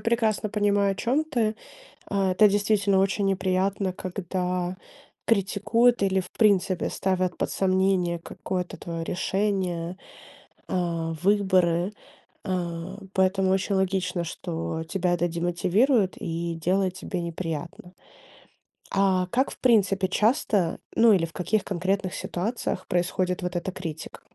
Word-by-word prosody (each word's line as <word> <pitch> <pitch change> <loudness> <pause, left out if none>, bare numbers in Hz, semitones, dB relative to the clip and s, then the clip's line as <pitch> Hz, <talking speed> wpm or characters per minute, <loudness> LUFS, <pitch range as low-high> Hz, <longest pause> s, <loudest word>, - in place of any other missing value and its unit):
прекрасно 225 -2 +1
понимаю, 205 -1 +2
о - - -5
чем 250 +9 +1
ты, 235 -8 0 0.5
а, 195 -2 +1
это 210 +3 +6
действительно 200 -1 +2
очень 195 +1 +1
неприятно, 190 0 0
когда 180 -1 -3 0.5
критикуют 225 +3 +2
или, 190 -1 +2
в 180 - -10
принципе, 195 -4 +3
ставят 185 -1 -1
под - - -1
сомнение 185 -2 +1
какое-то 180 +1 -5
твоё 165 -1 -5
решение, 185 -2 -1 0.7
а, 170 -2 -1
выборы, 185 -2 +2 0.5
а. 180 -1 -3 0.2
Поэтому 190 0 +2
очень 195 +1 +1
логично, 185 -2 0
что 165 -1 -4
тебя 180 +1 0
это 175 0 +1
демотивирует 185 - +1
и 170 0 -3
делает 185 +3 0
тебе 185 -2 -4
неприятно. 170 +1 -5 1.0
А 190 -2 +2
как, 255 +8 +1
в - - -12
принципе, 195 -6 +3
часто, 210 - +1 0.2
ну, 230 -1 +6
или 180 -4 +3
в 165 - -6
каких 205 +3 0
конкретных 190 0 -1
ситуациях 195 0 -3
происходит 180 +1 0
вот 180 0 -3
эта 185 +2 -3
критика? 165 -4 -7
185 Hz, 125 wpm, -26 LUFS, 175-200 Hz, 1.0 s, это